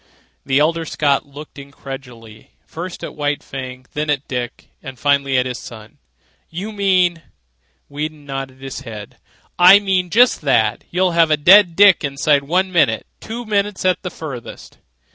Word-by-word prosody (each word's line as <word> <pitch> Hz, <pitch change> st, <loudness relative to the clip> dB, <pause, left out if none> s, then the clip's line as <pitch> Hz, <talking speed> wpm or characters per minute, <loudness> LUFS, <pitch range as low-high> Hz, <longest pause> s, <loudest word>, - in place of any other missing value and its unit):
The 135 Hz, 0 st, 0 dB
elder 165 Hz, +3 st, +1 dB
Scott 145 Hz, -2 st, 0 dB
looked 145 Hz, +1 st, -12 dB
incredulously, 130 Hz, -5 st, -11 dB
first 175 Hz, +2 st, -8 dB
at -, -, -6 dB
White 145 Hz, -1 st, -2 dB
Fang, 130 Hz, -1 st, -8 dB
then 150 Hz, 0 st, -3 dB
at 145 Hz, -1 st, -1 dB
Dick, 125 Hz, -2 st, -5 dB
and 135 Hz, -1 st, -9 dB
finally 140 Hz, -1 st, +1 dB
at 125 Hz, -, +2 dB
his 125 Hz, -1 st, -5 dB
son. 110 Hz, -2 st, -12 dB, 0.5 s
"You 190 Hz, +6 st, -6 dB
mean.. 185 Hz, -4 st, +1 dB, 0.3 s
.?" 60 Hz, +1 st, -45 dB
Weedon 150 Hz, +1 st, -6 dB
nodded 135 Hz, -1 st, -7 dB
his 135 Hz, -1 st, -7 dB
head. 105 Hz, -3 st, -10 dB, 0.4 s
"I 180 Hz, +3 st, +9 dB
mean 190 Hz, -3 st, 0 dB
just 240 Hz, +6 st, +4 dB
that. 115 Hz, -7 st, +1 dB
You'd 185 Hz, +1 st, +1 dB
have 165 Hz, -1 st, +3 dB
a 155 Hz, -, +2 dB
dead 175 Hz, +3 st, +6 dB
Dick 200 Hz, -1 st, +6 dB
inside 140 Hz, 0 st, +1 dB
one 185 Hz, +5 st, 0 dB
minute—two 175 Hz, -, -1 dB
minutes 205 Hz, -2 st, -1 dB
at 185 Hz, -1 st, +2 dB
the 180 Hz, -, -5 dB
farthest." 140 Hz, -9 st, -9 dB
145 Hz, 160 wpm, -18 LUFS, 135-180 Hz, 0.5 s, I